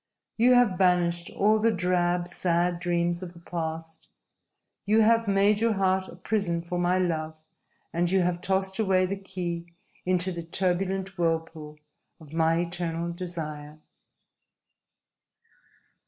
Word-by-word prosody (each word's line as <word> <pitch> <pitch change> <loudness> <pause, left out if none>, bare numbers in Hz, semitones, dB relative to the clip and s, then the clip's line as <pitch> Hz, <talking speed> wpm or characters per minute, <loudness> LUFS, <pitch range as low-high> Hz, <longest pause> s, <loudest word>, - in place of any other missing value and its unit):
You 245 +2 +5
have 220 -7 +3
banished 175 -2 +2
all 215 +2 +2
the 225 +2 +3
drab, 180 -2 0
sad 175 0 0
dreams 175 0 0
of 180 -2 -7
the 170 - -14
past! 165 -1 -6 0.8
You 215 +2 +3
have 230 0 +3
made 200 +1 +3
your 230 -1 +3
heart 190 -1 +1
a - - -11
prison 180 -3 -1
for 175 +1 -3
my 175 +1 +2
love, 160 -3 -1 0.6
and 175 +1 +1
you 190 +1 +3
have 175 0 -1
tossed 190 +1 -1
away 190 -3 +3
the 195 +2 -2
key 180 -3 -5 0.4
into 180 0 +1
the 170 -1 -5
turbulent 190 +2 -1
whirlpool 160 -2 -2 0.4
of 155 -2 -14
my 165 +1 +2
eternal 170 -1 -3
desire!" 155 -4 -6
175 Hz, 135 wpm, -27 LUFS, 170-190 Hz, 0.8 s, You